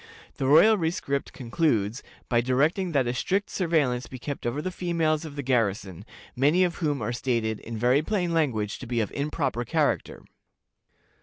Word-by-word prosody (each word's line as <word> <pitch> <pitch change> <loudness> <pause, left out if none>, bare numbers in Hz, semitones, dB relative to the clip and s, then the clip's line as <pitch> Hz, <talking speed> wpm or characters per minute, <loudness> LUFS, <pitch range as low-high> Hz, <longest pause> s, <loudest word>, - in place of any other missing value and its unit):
The 135 - -1
royal 205 +9 +6
rescript 160 -4 -2
concludes 120 -4 0 0.3
by 120 -1 +2
directing 150 +9 +1
that 135 -3 +2
a 120 - -1
strict 195 +10 -1
surveillance 150 -9 0
be 130 - -8
kept 140 0 -5
over 120 +5 -2
the 185 +4 -3
females 165 -3 0
of 150 -2 -8
the 145 - -4
garrison, 105 -8 -1 0.3
many 150 +8 +3
of 175 -2 -1
whom 145 -7 -1
are 120 - -2
stated, 115 -3 -1
in 115 0 -7
very 125 +5 +3
plain 175 -1 -1
language, 115 -10 0
to 130 - -8
be 120 0 -1
of 105 -4 -1
improper 140 -5 -2
character. - - -1
140 Hz, 170 wpm, -26 LUFS, 120-160 Hz, 0.3 s, royal